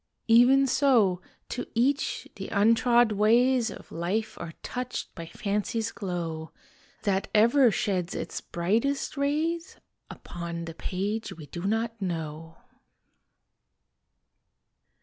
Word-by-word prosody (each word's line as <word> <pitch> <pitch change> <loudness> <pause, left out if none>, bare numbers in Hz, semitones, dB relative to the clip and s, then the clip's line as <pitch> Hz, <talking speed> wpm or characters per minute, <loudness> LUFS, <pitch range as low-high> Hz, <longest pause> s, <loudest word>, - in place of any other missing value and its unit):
Even 245 +4 +6
so 245 -9 +3 0.3
to 245 - -4
each 270 +5 +1
the - - -6
untrod 230 +2 +4
ways 235 +4 +3
Of - - -11
life 205 +7 -2
are 165 -1 -7
touched 250 0 -4
by 165 -1 -8
fancy's 210 +4 -2
glow, 170 -6 -4 0.5
That 195 -1 0
ever 235 +4 +6
sheds 185 -3 -1
its - - -4
brightest 225 - -1
rays 315 +5 -1 0.3
Upon 170 -1 -6
the 165 - -7
page 200 +6 -3
we 155 - -9
do 170 +5 -7
not 225 +1 -1
know! 165 -2 -4
215 Hz, 110 wpm, -27 LUFS, 175-245 Hz, 0.5 s, Even